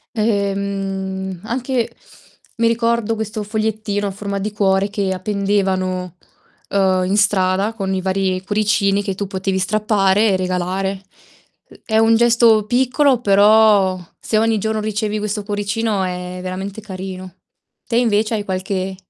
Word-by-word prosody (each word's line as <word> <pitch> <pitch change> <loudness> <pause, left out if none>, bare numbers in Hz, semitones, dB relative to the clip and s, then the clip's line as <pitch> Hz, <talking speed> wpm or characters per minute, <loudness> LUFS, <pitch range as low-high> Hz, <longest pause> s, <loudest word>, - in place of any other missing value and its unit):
Ehm, 195 -3 -2
anche 245 +1 -2 0.7
mi 230 0 +2
ricordo 230 -1 +1
questo 215 0 -4
fogliettino 215 -1 -2
a 200 - -2
forma 200 0 -4
di 205 +2 -3
cuore 195 -1 +2
che 200 -2 -1
appendevano, 185 -2 -1 0.5
ehm, 190 -2 +2
in 195 +3 0
strada 200 0 +2
con 195 -4 -3
i 185 - -2
vari 190 0 -1
cuoricini 205 -1 +1
che 195 -2 -3
tu 200 - -3
potevi 190 0 -2
strappare 205 +1 +2
e 195 - +2
regalare. 185 +1 -2 0.7
Ehm, - - -16
è 220 - +1
un 225 +1 +5
gesto 230 -2 +4
piccolo 260 +1 +2
però 205 -2 +5 0.2
se 215 - -1
ogni 225 -1 +2
giorno 220 +1 -1
ricevi 215 0 -2
questo 210 0 -2
cuoricino 205 0 -1
è 180 0 -4
veramente 190 +3 -5
carino. 185 -2 -8 0.5
Te 235 - 0
invece 220 -2 +2
hai 210 - -2
qualche 190 0 -3
200 Hz, 140 wpm, -19 LUFS, 190-220 Hz, 0.7 s, un